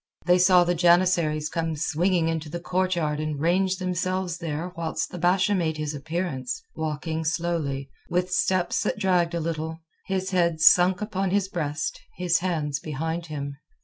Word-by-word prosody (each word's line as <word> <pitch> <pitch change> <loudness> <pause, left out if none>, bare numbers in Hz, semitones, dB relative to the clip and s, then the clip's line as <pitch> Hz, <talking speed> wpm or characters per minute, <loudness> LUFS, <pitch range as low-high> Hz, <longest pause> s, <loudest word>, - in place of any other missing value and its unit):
They 180 0 +5
saw 180 -1 +6
the 175 0 +1
janissaries 170 -3 +3
come 165 -1 -2
swinging 165 +3 +1
into 160 -1 -2
the 170 +3 -4
courtyard 175 -4 0
and 155 -2 -3
range 185 +4 +2
themselves 185 -1 -2
there 165 +1 -4
whilst 165 -2 -3
the 180 - -6
Basha 185 +4 +3
made 165 -5 0
his 155 -1 -3
appearance, 160 - -3
walking 160 +1 -3
slowly, 160 -4 -1 0.2
with 180 +1 0
steps 180 -1 +1
that - - -1
dragged 180 -2 +2
a - - 0
little, 160 0 -3 0.3
his 190 0 -1
head 170 -3 +2
sunk 180 +4 +5
upon 195 -3 -1
his 195 0 +1
breast, 155 -4 -3 0.2
his 180 -1 +2
hands 155 -6 -1
behind 160 +3 -4
him. 140 -2 -5
170 Hz, 160 wpm, -25 LUFS, 155-180 Hz, 0.3 s, saw